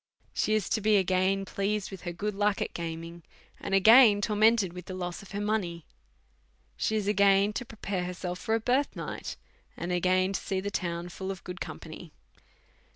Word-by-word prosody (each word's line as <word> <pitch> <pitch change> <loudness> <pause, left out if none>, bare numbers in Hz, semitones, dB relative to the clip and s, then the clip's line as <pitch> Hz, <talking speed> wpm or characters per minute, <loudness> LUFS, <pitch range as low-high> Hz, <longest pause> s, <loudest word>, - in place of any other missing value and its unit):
She 215 - +1
is 215 -4 0
to 220 - 0
be 210 0 +4
again 190 +1 +1
pleased 200 +1 -2
with 195 - -8
her - - -3
good 210 +5 -3
luck 205 0 +1
at - - -3
gaming, 165 0 -6 0.4
and 195 - -1
again 220 +1 +7
tormented 210 -2 +3
with 180 0 -9
the 185 - -5
loss 175 -1 -4
of 200 - -14
her 200 - -3
money. 200 -6 -2 0.9
She 220 - -1
is 210 -2 -1
again 200 0 +4
to 250 - -4
prepare 200 -5 -4
her 180 - -4
self 180 0 -5
for 220 - 0
a - - +1
bi»'th 255 +5 +1
night, - - -6 0.4
and 175 - -4
again 185 +2 +2
to - - -2
see 190 -2 -2
the 200 +2 -4
town 175 -2 -3
full 190 +2 -6
of 190 -2 -6
good 180 0 -8
con - - -5
any. 160 0 -10
195 Hz, 200 wpm, -29 LUFS, 180-210 Hz, 0.9 s, again